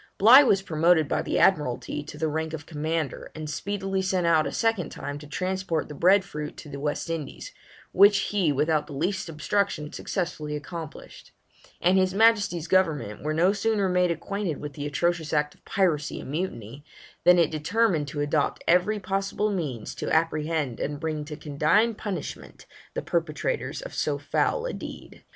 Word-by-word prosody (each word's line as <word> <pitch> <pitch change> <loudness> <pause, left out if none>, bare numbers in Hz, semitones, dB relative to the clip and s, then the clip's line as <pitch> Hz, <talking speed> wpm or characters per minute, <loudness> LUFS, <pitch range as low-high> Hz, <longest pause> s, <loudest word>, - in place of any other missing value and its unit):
Bligh 235 +7 +9
was 200 -8 +3
promoted 160 -2 +3
by - - 0
the - - -2
Admiralty 150 -4 +1
to 150 - -10
the 160 +1 0
rank 160 +1 -2
of 145 -2 -6
Commander, 160 -1 -3
and 155 -1 -6
speedily 195 +4 -2
sent 185 -2 0
out 160 -2 +3
a - - -4
second 225 -8 0
time 145 0 -6
to 150 - -11
transport 185 0 -2
the - - -6
bread 185 +7 +4
fruit 150 -5 -6
to 150 - -10
the 140 -1 -7
West 145 +3 -2
Indies, 165 -4 -5 0.4
which 200 +2 +6
he 190 -7 +2
without 150 +2 +1
the 145 - -9
least 180 +6 -2
obstruction 160 0 -1
successfully 155 -5 -3
accomplished; 155 +1 -9 0.5
and 185 +2 +4
his 185 0 +1
Majesty's 205 -6 +3
government 150 - +1
were 155 - -1
no 175 +5 +3
sooner 205 -1 +1
made 180 -1 +2
acquainted 170 0 -3
with 150 -1 -6
the 145 +2 -4
atrocious 165 +1 -1
act 150 -1 +1
of - - -28
piracy 165 -7 0
and - - -8
mutiny, 145 - -4 0.4
than 180 0 +7
it 170 -3 +3
determined 160 0 +1
to 145 0 -4
adopt 145 0 0
every 180 +5 +3
possible 195 +2 -1
means 145 - -3
to - - -4
apprehend 155 -4 0
and 145 0 -3
bring 155 -1 -3
to 150 0 -7
condign 155 +10 +2
punishment 205 -3 -6 0.3
the - - -2
perpetrators - - -2
of - - -8
so - - -1
foul 480 - 0
a - - -3
deed. - - -9
165 Hz, 175 wpm, -26 LUFS, 150-190 Hz, 0.5 s, Bligh